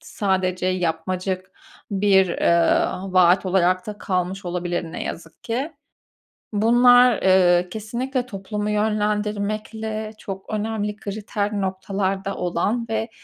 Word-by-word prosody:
sadece 185 -2 -1
yapmacık 185 +1 -2 0.4
bir, 195 -2 +4
eee, 170 0 +3 0.3
vaat 185 +1 +5
olarak 185 0 +2
da 210 -1 -6
kalmış 185 +1 -2
olabilir 175 -1 -3
ne - - -5
yazık 165 -1 -8
ki. 265 +7 -2 0.8
Bunlar, 245 +2 +5
eee, 180 -1 +4
kesinlikle 240 +5 -3
toplumu 210 -1 -4
yönlendirmekle 215 +1 -1
çok 190 -1 -7
önemli 210 -1 -2
kriter 205 0 -3
noktalarda 195 +1 -2
olan 220 +6 -1
ve 225 +1 -1
200 Hz, 105 wpm, -22 LUFS, 185-215 Hz, 0.8 s, vaat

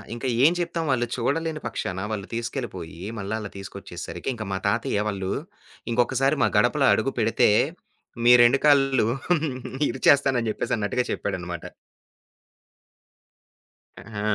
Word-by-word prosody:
ఇంకా 120 +3 -4 0.2
ఏం 155 - +7
చెప్తాం? 170 -1 -2
వాళ్ళు 120 -2 +1
చూడలేని 150 +5 -1
పక్షాన 95 +2 -4
వాళ్ళు 100 -3 -4
తీసుకెళ్ళిపోయి, 115 -9 -5 0.2
మళ్ళా 100 +2 -3
ఆళ్ళని 105 -2 -7
తీసుకొచ్చేసరికి 100 +6 -7
ఇంక 110 -3 -6
మా 95 - -1
తాతయ్య 100 +1 0
వాళ్ళు 95 -2 -3 0.6
ఇంకొకసారి 135 +4 +2
మా - - +3
గడపలో - - +3
అడుగు - - 0
పెడితే, - - +3 0.8
మీ 120 - +8
2 120 +3 +5
కాళ్ళు 135 -5 +4 0.8
ఇరిచేస్తానని 135 -5 +3
జెప్పేసి 125 - -2
అన్నట్టుగా 125 +4 0
చెప్పాడనమాట. 90 -3 -4 2.5
హా! 105 - -4
120 Hz, 115 wpm, -24 LUFS, 100-135 Hz, 2.5 s, మీ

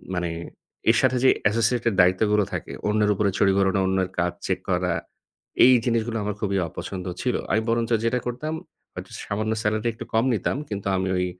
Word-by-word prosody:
মানে 90 -1 -1 0.6
এর - - +1
সাথে 130 - +3
যে, - - +8 0.2
associated 115 +1 +1
দায়িত্ব 90 +1 +3
গুলো 105 0 +4
থাকে, - - -4 0.2
অন্যের 105 0 +2
উপরে 100 +1 +1
ছড়ি 95 - +4
ঘুরানো, 95 0 +2
অন্যের 95 -1 0
কাজ 90 0 +1 0.2
চেক 95 -1 0
করা, 90 -1 +1 0.7
এই 130 - +8
জিনিসগুলো 115 -1 0
আমার 105 0 -2
খুবই 100 -2 0
অপছন্দ 90 +3 -6 0.2
ছিল। 125 -1 0 0.2
আমি 110 - +3
বরঞ্চ 115 0 0
যেটা 125 +2 +1
করতাম 125 +6 -3 0.4
হয়তো - - -8
সামান্য 110 +2 -1
salary 110 +2 0
একটু 115 +1 -8
কম 110 +2 +3
নিতাম 115 - -1
কিন্তু 100 -2 -4
আমি 95 0 -1
ওই 90 - +1
105 Hz, 185 wpm, -24 LUFS, 95-115 Hz, 0.7 s, যে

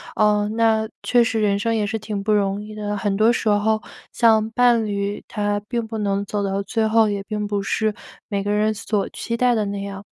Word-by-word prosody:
嗯， 210 0 +2
那 220 -1 +2
确 240 -1 +4
实 225 -1 -1
人 200 -1 +2
生 230 +1 0
也 210 -2 +1
是 220 +1 -3
挺 210 -2 -4
不 215 0 +1
容 200 0 0
易 215 0 -9
的， 205 -1 -3
很 200 -1 -1
多 220 +3 +4
时 225 - -2
候 215 +1 +2 0.3
像 220 -1 +3
伴 240 -1 +3
侣， 200 0 -3
他 205 -1 -1
并 235 -2 -1
不 220 0 -5
能 200 -1 -1
走 205 0 -2
到 195 0 -1
最 220 +1 0
后， 220 0 +4
也 200 -1 -2
并 210 +1 -4
不 205 -1 -1
是 215 +2 0 0.4
每 200 -1 -1
个 205 - -3
人 215 +1 +2
所 210 -1 -2
期 230 0 -4
待 250 0 +3
的 215 -2 0
那 200 0 -4
样。 200 0 -7
210 Hz, 240 characters per minute, -22 LUFS, 205-220 Hz, 0.4 s, 确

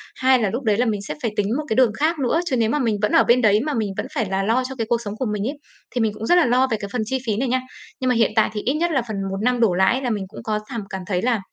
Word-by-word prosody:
hai 260 0 +3
là 215 -4 +1
lúc 240 +7 -4
đấy 215 -3 +2
là 245 - +2
mình 210 -4 -1
sẽ - - -3
phải 230 -4 -1
tính 205 -1 +1
một 305 - -2
cái - - +1
đường 250 -3 +4
khác 315 +2 +1
nữa. 270 +4 +1
Chứ 290 -7 0
nếu 225 -2 +2
mà 295 - 0
mình 230 -5 +1
vẫn 210 - +1
ở - - +5
bên 245 +1 +4
đấy 210 -2 +4
mà 305 - -1
mình 220 -4 -1
vẫn - - -2
phải 225 - +1
là 195 0 0
lo 230 +5 +1
cho 265 - -6
cái 225 -3 -3
cuộc 235 -1 +1
sống 205 -2 -5
của 260 - -2
mình 205 -1 -2
ấy, 285 +3 -4 0.4
thì 245 - +1
mình 220 -2 +1
cũng 215 - -6
rất 350 - +4
là 355 - +5
lo 250 +2 +3
về 220 - +1
cái 200 - -6
phần 250 - 0
chi 265 +5 -1
phí 210 -2 0
này 260 +4 0
nha. 255 +1 +1 0.4
Nhưng 255 - 0
mà 250 - +2
hiện 225 -2 +3
tại 220 - +3
thì 210 - -3
ít 260 - 0
nhất 335 +3 0
là 270 -5 +2
phần 215 - -4
1 195 - -3
năm 245 +2 +1
đổ 225 -6 +3
lại 190 +8 +2
là 255 - -1
mình 210 -4 -1
cũng 205 - -11
có 215 -1 -1
thảm 235 -4 -4
cảm 190 -1 -5
thấy 180 -3 0
là, 235 -1 +1
230 Hz, 360 wpm, -22 LUFS, 210-255 Hz, 0.4 s, ở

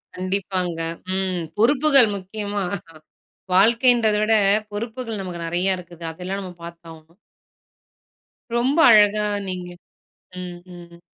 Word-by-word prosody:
கண்டிப்பாங்க, 185 -2 -3 0.4
ம். 185 -2 -1 0.2
பொறுப்புகள் 275 +1 +5
முக்கியமா 205 +1 -4 0.9
வாழ்க்கைன்றத 230 +2 +4
விட, 225 - +2 0.4
பொறுப்புகள் 225 0 -5
நமக்கு 175 -2 -6
நெறய 180 +3 +1
இருக்குது. 170 -1 -12
அதெல்லாம் 185 +4 -5
நம்ம 185 -2 -8
பாத்தாவணும். 170 0 -13 1.4
ரொம்ப 260 +6 +1
அழகா 210 -1 +5 0.2
நீங்க 180 -1 -5 0.7
ம், 180 -1 -7
ம் 175 -1 -11
m. - - -21
190 Hz, 100 wpm, -22 LUFS, 175-220 Hz, 1.4 s, பொறுப்புகள்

